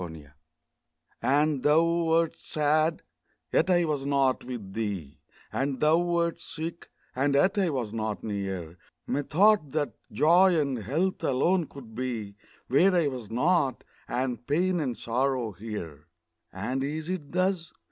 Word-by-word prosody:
And 145 0 +2
thou 155 +4 +4
wert 165 -1 +2
sad 155 +2 0 0.5
yet - - +3
I 175 -2 +4
was 150 -3 -1
not 140 -2 +1
with 115 -6 -7
thee; 100 -10 -4 0.3
And 135 -1 -1
thou 155 +2 +4
wert 170 -1 0
sick, 165 +2 -7 0.3
and 140 +2 +1
yet 190 +8 +3
I 190 -3 +2
was 125 -7 -3
not 110 -2 -3
near; 95 -5 -4 0.3
Methought 155 +2 +2
that 145 -7 -1 0.2
Joy 170 - +5
and 140 -4 -1
Health 155 - -1
alone 165 +6 +2
could 125 -5 -12
be 115 -4 -4 0.3
Where 180 +8 +4
I 165 -5 +3
was 125 -5 -7
not 140 +3 +1 0.2
and 125 -2 -2
pain 175 +5 +1
and 130 -6 -2
sorrow 125 -1 0
here! 85 -7 -7 0.4
And 125 +8 -2
is 155 +3 -3
it 180 -6 -4
thus? 185 -1 0
140 Hz, 135 wpm, -27 LUFS, 120-165 Hz, 0.5 s, Joy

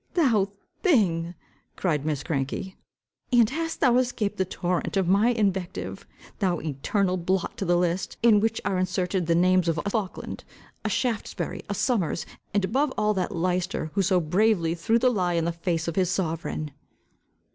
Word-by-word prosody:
"Thou 230 - +3 0.3
thing," 180 - +2 0.4
cried 155 -5 -1
Miss 145 -3 -1
Cranky, 160 +5 -3 0.6
"and 240 -3 +6
hast 325 +2 -3
thou 250 -4 +5
escaped 230 -5 0
the 190 - +1
torrent 180 +1 -2
of 190 -3 +2
my 200 +5 +4
invective! 195 -6 -2 0.3
Thou 185 -5 +1
eternal 180 +6 -1
blot 185 +1 -1
to 195 - -2
the 175 0 +3
list, 175 +1 -1
in 225 -3 +6
which 225 +1 0
are 195 -2 0
inserted 185 -1 -1
the 165 - +3
names 185 0 +3
of 165 -1 +1
a - - -2
Faulkland, 205 -2 -3 0.4
a - - -1
Shaftesbury, 240 -5 -2
a 205 - -1
Somers, 190 - 0 0.3
and 200 -1 +1
above 275 +7 +1
all, 210 0 +2
that 185 -3 -1
Leicester, 175 -2 -1
who 200 - +2
so 185 -1 +3
bravely 175 0 +2
threw 175 +7 +1
the 250 +1 +3
lie 180 -6 0
in 165 -1 +1
the 170 - +1
face 170 0 -2
of 170 - -2
his 185 -3 +2
sovereign!" 165 -4 -2
185 Hz, 170 wpm, -26 LUFS, 170-210 Hz, 0.6 s, and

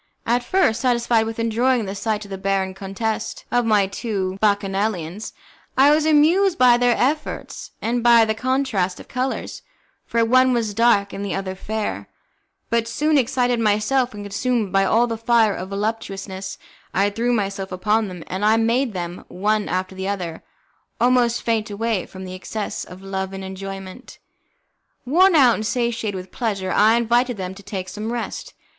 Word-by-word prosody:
At 240 +1 +1
first, 245 -8 +2
satisfied 235 -3 +2
with 225 - -5
enjoying 230 +1 +1
the 195 - -4
sight 210 +1 -2
of 200 - -13
the 195 - -4
barren 195 -1 0
contest 195 +3 -4
of 245 -1 +2
my 210 -3 +4
two 195 -2 -3
bacchanalians, 200 -2 -1 0.5
I 275 +2 +6
was 305 +1 +3
amused 335 +5 +4
by 245 -1 +6
their 245 -1 +3
efforts 300 +4 -2
and 240 +2 0
by 235 -1 +6
the 220 - 0
contrast 245 -6 -1
of - - -12
colours, 255 +1 -3 0.5
for 230 -1 +2
one 255 +2 +4
was 225 -3 -1
dark 205 -3 +3
and 200 - -5
the 200 - -2
other 190 -1 -3
fair, 215 +3 -4 0.6
but 230 -1 +1
soon, 300 +7 +1
excited 245 -2 +2
myself, 225 +4 +1
and 205 - -7
consumed 210 0 -1
by 195 0 +4
all 230 +5 +3
the 230 -2 -4
fire 225 -2 +3
of 185 +1 -6
voluptuousness, 195 -2 -4 0.4
I 200 +2 +2
threw 235 +4 0
myself 195 -4 -2
upon 210 +4 +1
them, 180 -3 -8
and 190 +3 -4
I 215 +1 +4
made 230 +2 +1
them, 175 -1 -5
one 210 +3 -1
after 185 +1 -2
the 190 0 -5
other, 180 -5 -4 0.6
almost 245 -1 +2
faint 225 -2 0
away 215 -1 -2
from 190 0 -9
the 185 - -7
excess 205 +3 -5
of 185 +1 -12
love 190 0 -4
and 195 0 -6
enjoyment. 195 +3 -8 0.9
Worn 350 +7 +4
out 260 -6 +6
and 215 - -3
satiated 230 -3 -1
with 185 0 -7
pleasure, 195 -5 -2
I 215 +4 +5
invited 240 +1 +1
them 185 -1 -4
to 195 - -12
take 195 -2 -5
some 215 +4 -5
rest. 240 0 -5
220 Hz, 175 wpm, -22 LUFS, 195-240 Hz, 0.9 s, I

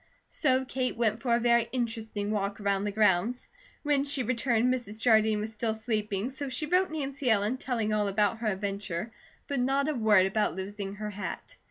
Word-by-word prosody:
So 260 -3 +2
Kate 255 -2 -2
went 225 -1 +1
for 240 -2 +2
a - - +2
very 235 -1 +3
interesting 225 -4 -2
walk 200 -1 -2
around 200 -1 0
the 205 - -1
grounds. 210 +3 +2 0.4
When 290 -2 +2
she 280 -2 -1
returned 245 0 +2
Mrs. 220 -4 -5
Jardine 220 -2 +4
was 220 +1 -5
still 220 0 -1
sleeping 215 0 -2
so 275 +1 -5
she 280 +4 -2
wrote 365 +4 +2
Nancy 280 -4 -2
Ellen, 215 +3 +2
telling 235 -5 -1
all 210 -1 +1
about 205 +2 +1
her 230 - -2
adventure, 200 0 -3 0.4
but 280 -2 -1
not 270 +3 +1
a 310 - +1
word 215 -6 +4
about 210 +2 0
losing 195 +1 -5
her 210 0 -5
hat. 205 0 -6
220 Hz, 190 wpm, -29 LUFS, 205-255 Hz, 0.4 s, Jardine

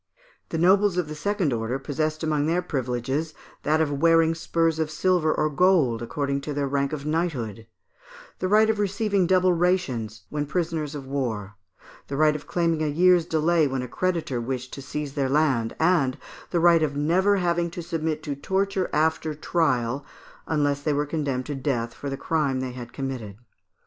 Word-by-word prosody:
The 165 - -2
nobles 190 +2 +4
of 155 -4 -2
second 185 -3 0
order 115 +2 -2
possessed 155 +3 -2
among 150 -2 +1
their 175 +2 +1
privileges 130 +4 -2 0.3
that 155 +1 +2
of 155 -2 +1
wearing 165 -1 +5
spurs 165 -1 0
of 160 -1 0
silver 160 0 +2
or 155 - +1
gold 150 -7 +3
according 140 +3 -2
to 145 0 -5
their 145 -1 0
rank 140 0 0
of 150 -2 -5
knighthood; 135 - -2 0.7
the 185 - 0
right 215 +3 +5
of 220 -1 0
receiving 200 -2 +1
double 185 0 +4
rations 135 - 0
when 150 -1 -2
prisoners 160 -2 -2
of 140 -2 -6
war; 115 -8 -3 0.5
the 140 - -4
right 155 0 +4
of 150 - -7
claiming 165 -2 0
a 155 - +1
year's 175 +3 +4
delay 160 0 +2
when 135 -1 -2
a - - -5
creditor 165 -7 -1
wished 130 +1 -4
to 140 - -6
seize 145 +1 -5
their 140 -2 0
land; 135 -6 +1
and 160 -6 +2 0.3
the 175 - +1
right 170 -1 +5
of 145 -2 0
never 180 +8 +3
having 175 -2 0
to 170 +1 -7
submit 160 -2 -2
to 145 - -3
torture 190 +5 -1
after 155 0 +1
trial, 140 -5 0 0.4
unless 145 -2 +1
they 150 0 0
were 145 +1 0
condemned 140 -4 -2
to 150 - -4
death 125 -4 -2
for 140 - -6
the 135 - -4
crime 145 -4 0
they 130 -1 -3
had 120 -1 -8
committed. 125 -7 -5
150 Hz, 180 wpm, -25 LUFS, 135-170 Hz, 0.7 s, wearing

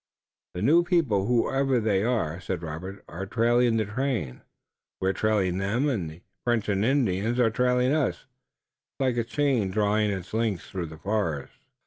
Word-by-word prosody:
"The 90 - -3
new 165 +8 +5
people, 145 - +1
whoever 135 +2 +2
they 105 -4 +1
are," 110 -9 0
said 90 -2 -4
Robert, 90 +5 -6
"are 95 +3 -6
trailing 120 +1 +2
the 110 - +1
train, 105 - -2 0.6
we're 95 +1 +1
trailing 95 -3 +1
them, 110 +9 0
and 100 - -1
the 80 +3 -13 0.2
French 120 -3 0
and 100 0 +1
Indians 115 -3 +1
are 115 -2 +4
trailing 125 +3 +2
us. 155 -4 0 0.7
It's - - -65
like 130 -3 +1
a 120 - +2
chain 125 -4 0
drawing 105 +2 +1
its 95 -1 -5
links 110 -5 -1
through 90 -3 -3
the 80 0 -10
forest." 85 -5 -2
110 Hz, 165 wpm, -26 LUFS, 95-125 Hz, 0.7 s, new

